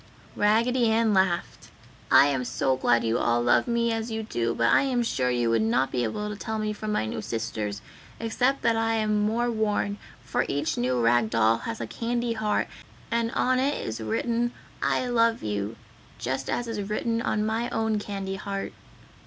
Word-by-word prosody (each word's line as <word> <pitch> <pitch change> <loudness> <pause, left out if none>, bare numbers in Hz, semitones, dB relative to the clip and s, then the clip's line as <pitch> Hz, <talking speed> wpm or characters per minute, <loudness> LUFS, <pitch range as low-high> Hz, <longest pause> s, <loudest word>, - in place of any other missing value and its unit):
Raggedy 230 +4 +3
Ann 220 -1 +3
laughed, 190 -3 0 0.4
"I - - +8
am 135 -3 0
so 130 +2 0
glad 120 -2 +2
you 115 +1 +1
all 120 0 +2
love 120 - +3
me 235 -1 +1
as 225 +1 -2
you 220 0 -3
do, 120 - -1
but 115 0 +3
I - - +6
am 255 -3 +1
sure 130 - 0
you 120 -2 +1
would 115 -1 +3
not 120 +4 +1
be 125 - 0
able 210 - -2
to 210 - -4
tell 220 +2 -4
me 215 0 -1
from 215 0 -4
my 160 - 0
new 110 0 -4
sisters, 110 -2 -4 0.4
except 250 +4 0
that 230 - +3
I 225 0 +1
am 215 -1 +1
more 235 +3 +1
worn, 210 -2 -1 0.3
for - - 0
each 145 +3 -1
new 125 +1 0
rag 115 -1 +3
doll 115 0 +3
has - - -4
a 115 - -3
candy 235 - -2
heart, 215 -2 0 0.4
and 230 0 +1
on 255 0 +2
it 280 +3 0
is 110 0 -4
written, 235 - -1 0.3
'I - - +1
love 230 -1 +2
you' 105 +1 -2 0.4
just 130 +2 -3
as 245 - -1
is 210 -3 -4
written 230 +2 -1
on 215 -2 0
my 225 +2 -1
own 220 -1 0
candy 195 -2 -4
heart." 195 0 -4
210 Hz, 195 wpm, -26 LUFS, -, 0.4 s, I